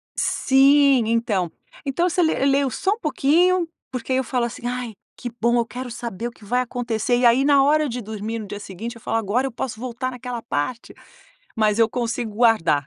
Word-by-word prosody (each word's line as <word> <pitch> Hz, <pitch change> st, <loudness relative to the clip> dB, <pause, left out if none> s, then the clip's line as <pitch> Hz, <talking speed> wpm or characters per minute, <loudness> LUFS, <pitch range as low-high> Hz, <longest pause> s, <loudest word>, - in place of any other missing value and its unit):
Sim, 275 Hz, -1 st, +4 dB
então 215 Hz, -7 st, 0 dB, 0.3 s
então 340 Hz, +6 st, +1 dB
você 360 Hz, +1 st, +1 dB
le 320 Hz, -, +2 dB
leio 275 Hz, 0 st, +3 dB
só 385 Hz, -, 0 dB
um 440 Hz, -, -9 dB
pouquinho, 340 Hz, -, +2 dB, 0.2 s
porque 255 Hz, 0 st, -5 dB
aí 260 Hz, -, +3 dB
eu 265 Hz, -, +1 dB
falo 250 Hz, -1 st, -1 dB
assim: 240 Hz, +1 st, -7 dB
"Ai, 245 Hz, -2 st, -3 dB, 0.2 s
que 245 Hz, -, -6 dB
bom 235 Hz, +1 st, +3 dB
eu 235 Hz, -, +2 dB
quero 245 Hz, +1 st, -7 dB
saber 235 Hz, -2 st, -5 dB
o -, -, -7 dB
que 230 Hz, -, -20 dB
vai 245 Hz, +5 st, +1 dB
acontecer" 240 Hz, -1 st, -1 dB
e 245 Hz, -, +2 dB
aí 240 Hz, +3 st, +5 dB
na 280 Hz, -1 st, +5 dB
hora 300 Hz, +2 st, +3 dB
de 245 Hz, +1 st, -4 dB
dormir 220 Hz, +1 st, -5 dB
no 215 Hz, -, -7 dB
dia 205 Hz, -, -6 dB
seguinte, 210 Hz, +4 st, -7 dB
eu 230 Hz, -, -14 dB
falo: 225 Hz, -, -1 dB
"Agora 225 Hz, +5 st, 0 dB
eu -, -, -6 dB
posso 230 Hz, -1 st, -5 dB
voltar 255 Hz, +1 st, -4 dB
naquela 250 Hz, -1 st, -6 dB
parte", 225 Hz, -, -3 dB, 0.6 s
mas 215 Hz, -1 st, +2 dB
eu 225 Hz, -1 st, +4 dB
consigo 235 Hz, -2 st, -3 dB
guardar. 205 Hz, -, +3 dB
240 Hz, 210 wpm, -22 LUFS, 225-265 Hz, 0.6 s, aí